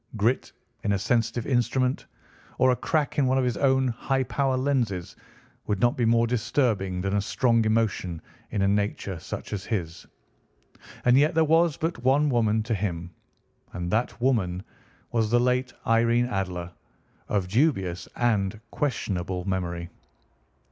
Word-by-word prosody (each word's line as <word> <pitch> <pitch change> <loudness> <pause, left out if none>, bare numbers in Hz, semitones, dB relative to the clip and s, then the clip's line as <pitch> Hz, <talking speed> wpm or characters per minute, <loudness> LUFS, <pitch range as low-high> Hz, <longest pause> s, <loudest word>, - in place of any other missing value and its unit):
Grit 115 +5 +1 0.3
in 100 - +1
a - - +2
sensitive 115 +2 0
instrument, 130 0 0 0.5
or 130 - +4
a - - +2
crack 150 +2 -1
in 135 - +3
one 130 +1 +2
of 130 - +2
his 125 -3 0
own 130 +1 +2
high 135 +3 -1
power 135 0 0
lenses, 125 -10 -1 0.5
would 105 -2 0
not 120 +3 +3
be 120 - +1
more 115 +1 +4
disturbing 110 -6 0
than 95 +1 -1
a - - +2
strong 115 +2 +2
emotion 110 -6 0 0.3
in 100 -3 -1
a - - +3
nature 100 -2 -1
such - - -7
as 100 -2 -3
his. 85 -7 -4 1.0
And 125 0 +6
yet 155 +3 +3
there 160 - +5
was 165 0 +3
but 160 -7 -3
one 140 +3 +3
woman 110 -3 +2
to 115 +1 -2
him, 90 -4 -3 0.6
and 90 0 -4
that 115 +2 0
woman 100 -8 +1 0.5
was 110 -2 +1
the 120 +2 +4
late 125 +1 +1
Irene 115 +1 +3
Adler, 90 -6 -3 0.6
of 100 -3 0
dubious 95 - +1
and 110 -4 0
questionable 95 -10 -2
memory. 85 -3 -3
115 Hz, 155 wpm, -26 LUFS, 95-130 Hz, 1.0 s, And